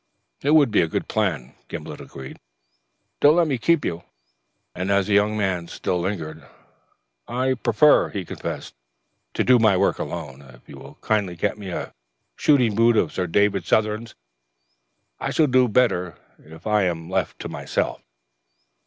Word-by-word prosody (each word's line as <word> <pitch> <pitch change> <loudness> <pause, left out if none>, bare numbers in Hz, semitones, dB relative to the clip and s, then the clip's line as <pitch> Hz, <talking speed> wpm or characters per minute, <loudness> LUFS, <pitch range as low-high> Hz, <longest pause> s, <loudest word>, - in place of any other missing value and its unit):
"It 145 +3 +3
would 145 -6 +5
be 105 - +4
a 85 - +1
good - - -3
plan," 80 -12 -2
Gimblet - - -7
agreed. 65 -1 -10 0.8
"Don't 145 +2 +6
let 175 -1 +4
me 135 -6 -1
keep 170 +4 +2
you," 85 +1 -3 0.7
And 90 +2 -4
as 100 -1 +2
the 105 - -1
young 105 +1 +3
man 95 -4 -1
still 90 +1 -2
lingered, 80 -5 -4 0.8
"I 130 +2 0
prefer," 130 +4 +3
he 95 -3 -5
confessed, - - -6 0.6
"to - - +1
do 125 -1 +5
my 110 -4 +4
work - - +1
alone. 65 +1 -6
If 65 -3 -17
you - - -11
will - - -13
kindly 100 -5 0
get 95 +5 -2
me 100 -2 -7
a 85 - -5 0.4
shooting 125 -7 +3
boot 115 +2 +3
of - - +1
Sir 90 - -2
David 100 +3 +2
Southern's, 110 +1 0 1.0
I - - -3
shall 160 - +3
do 130 -2 +3
better 100 -7 +1 0.2
if 80 +2 -15
I 105 -2 +2
am 85 -2 -3
left 95 - -2
to - - -5
myself." - - -3
105 Hz, 165 wpm, -23 LUFS, 85-120 Hz, 1.0 s, Don't